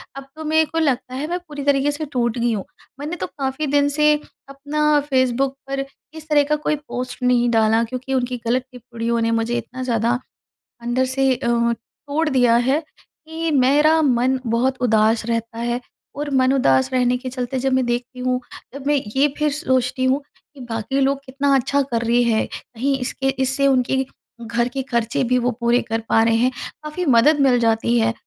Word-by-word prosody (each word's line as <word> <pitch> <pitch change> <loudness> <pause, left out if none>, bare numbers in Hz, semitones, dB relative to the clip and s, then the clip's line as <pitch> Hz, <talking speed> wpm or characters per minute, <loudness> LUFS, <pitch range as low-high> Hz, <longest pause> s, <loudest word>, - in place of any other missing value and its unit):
अब 275 0 -8
तो 315 - -7
मेरे 315 +1 +3
को 320 +2 -3
लगता 260 -5 0
है 285 +4 -3
मैं 350 +2 -2
पूरी 300 -5 -8
तरीके 285 0 +3
से 300 +2 -4
टूट 235 -2 0
गई 240 0 +1
हूँ। 200 -3 -3 0.3
मैंने 300 +4 -4
तो - - -3
काफ़ी 275 +2 -3
दिन 285 0 +3
से 300 +1 +3 0.4
अपना 295 +2 +1
फेसबुक 260 0 +1
पर, 275 0 -2 0.3
इस 315 -1 -11
तरह 295 -1 +4
का - - +5
कोई 300 0 -1
पोस्ट 250 0 -5
नहीं 245 -1 +3
डाला 225 0 +3
क्योंकि 255 +3 -5
उनकी 250 -1 -1
गलत 250 +2 +1
टिप्पणियों 235 -1 -3
ने 230 0 +1
मुझे 230 +1 0
इतना 245 +2 -6
ज़्यादा, 235 0 0 0.6
अंदर 240 +2 0
से 265 0 +1
अ, 235 - -4
तोड़ 235 +6 -1
दिया 245 -4 +4
है, 260 +5 +2 0.5
कि 325 0 -3
मेरा 295 +4 +4
मन 260 -2 +2
बहुत 250 +3 +1
उदास 220 -1 +2
रहता 230 0 -3
है 240 +1 -2 0.3
और 295 +1 -3
मन 260 0 +3
उदास 135 - +3
रहने 250 -1 +2
के 255 +1 -6
चलते 255 0 -3
जब 265 +1 0
मैं 260 -1 +2
देखती 245 +1 -3
हूँ, 250 0 0 0.3
जब 280 0 -7
मैं 295 - +3 0.2
ये 275 +2 +4
फिर 300 0 +1
सोचती 260 -3 0
हूँ 265 +2 +2 0.3
कि - - -14
बाकी 225 +4 -2
लोग 275 0 +2
कितना 275 +2 0
अच्छा 275 +2 +1
कर 245 -4 -2
रहे 240 +1 +3
हैं, 225 -2 +1
कहीं 270 +4 -3
इसके 270 +1 -2
इससे 270 +1 +1
उनके 265 0 +2 0.4
घर 235 +1 0
के 270 +2 -3
खर्चे 235 -1 -1
भी 250 0 +2
वो 245 +1 0
पूरे 235 +1 +3
कर 225 +1 0
पा 225 - +4
रहे 225 0 +3
हैं, 245 +3 +2 0.3
काफ़ी 305 +4 -4
मदद 285 +3 +4
मिल 255 -3 +4
जाती 230 +1 +2
है 225 0 +2
255 Hz, 195 wpm, -21 LUFS, 235-280 Hz, 0.6 s, का